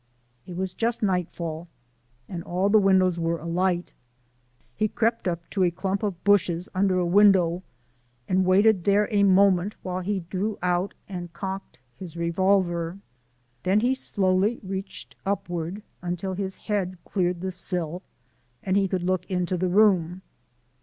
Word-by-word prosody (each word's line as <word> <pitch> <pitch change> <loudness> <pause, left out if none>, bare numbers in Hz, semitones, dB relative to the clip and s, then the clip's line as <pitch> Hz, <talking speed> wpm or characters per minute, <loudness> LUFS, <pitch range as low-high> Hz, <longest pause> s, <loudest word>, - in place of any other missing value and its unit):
It 180 - -7
was 190 0 -2
just 230 0 -1
nightfall 175 -3 -2 0.6
and 175 -2 -5
all 185 +3 0
the 215 +1 +6
windows 185 -3 +3
were 165 0 0
alight. 175 +2 -1 0.8
He 215 - +1
crept 230 -1 0
up 170 -1 -3
to 195 - -1
a 180 - +4
clump 190 +3 -2
of 195 -5 -3
bushes 180 -3 +2
under 185 -1 +2
a 180 - +1
window 180 -2 +4 0.7
and 185 0 +2
waited 190 +1 +4
there 205 +1 +3
a 205 -1 +3
moment 195 0 +4
while 185 0 -3
he 195 +1 -2
drew 190 +5 -3
out 180 +2 0
and 175 -3 -6
cocked 190 +2 -6 0.2
his 175 -3 -9
revolver. 175 0 +1 0.6
Then 190 +7 +2
he 250 +3 +2
slowly 200 -3 +1
reached 190 0 -6
upward 175 0 -3 0.2
until 180 +2 -3
his 190 0 -3
head 190 -4 -2
cleared 180 -3 -1
the 190 0 -2
sill 180 -1 -2 0.6
and 190 -1 0
he 200 -1 +3
could 185 -1 -2
look 185 +1 -1
into 180 -1 -1
the 180 +1 0
room. 185 -3 +3
185 Hz, 150 wpm, -25 LUFS, 175-200 Hz, 0.8 s, the